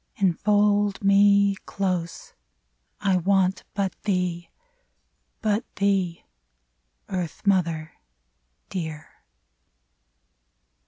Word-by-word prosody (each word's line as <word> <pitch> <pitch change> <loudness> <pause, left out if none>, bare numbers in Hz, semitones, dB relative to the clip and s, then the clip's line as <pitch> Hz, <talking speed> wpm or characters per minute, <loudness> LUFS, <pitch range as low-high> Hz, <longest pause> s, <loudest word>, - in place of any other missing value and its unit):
Enfold 205 0 +2
me 200 0 +5
— - - -40
close; 180 -4 -3 0.7
I 195 -2 +2
want 190 +1 +1
but 195 -3 -1
thee 180 -3 -1
I - - -42 0.9
But 215 0 -1
thee. 195 -4 0 0.8
Earth 180 -2 -5
mother 165 -5 +1 0.8
dear 160 -4 -5
195 Hz, 75 wpm, -25 LUFS, 175-200 Hz, 0.9 s, me